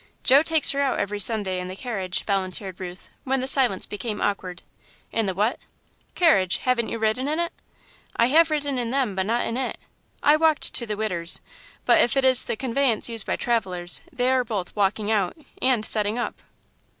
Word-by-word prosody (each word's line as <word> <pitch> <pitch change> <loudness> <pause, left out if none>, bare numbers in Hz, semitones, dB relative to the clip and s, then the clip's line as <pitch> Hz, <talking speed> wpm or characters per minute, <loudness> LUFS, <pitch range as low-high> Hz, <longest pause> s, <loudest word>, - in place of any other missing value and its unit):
"Joe 270 +3 +6
takes 320 -1 +5
her 280 - -1
out 275 -2 0
every 205 +1 -3
Sunday 200 -3 +2
in 180 - -5
the 185 - -7
carriage," 195 -6 -4
volunteered 190 -1 -3
Ruth, 180 -1 -9
when 265 0 -1
the 255 - -3
silence 255 -8 +3
became 210 0 -5
awkward. 185 -3 -3 0.5
"In 225 -2 -1
the 190 - -2
what?" 210 +6 0 0.6
"Carriage 195 - +3
haven't 250 -3 -1
you - - -4
ridden 220 +4 -1
in 305 +2 -1
it?" 340 0 -2 0.6
"I 230 - +3
have 320 +6 +4
ridden 285 -4 -2
in 235 -1 -3
them, 260 -5 -1
but 190 0 -2
not 235 +2 0
in 230 - -3
it. 265 - -3 0.5
I 295 +1 +5
walked 315 -1 +1
to 235 - 0
the 210 -1 -4
'Widder's,' 180 -6 0 0.5
but - - +5
if 245 - +1
it 270 - +2
is 260 -1 +5
the - - -2
conveyance 255 -2 0
used 225 -3 0
by - - 0
travellers, 185 -7 -1
they 255 -3 0
are 260 -1 +2
both 210 -6 -5
'walking 205 +1 0
out' 200 - 0 0.2
and 250 -4 +1
'settin' 215 +1 +3
up.'" 240 - -4
230 Hz, 200 wpm, -23 LUFS, 195-260 Hz, 0.6 s, Joe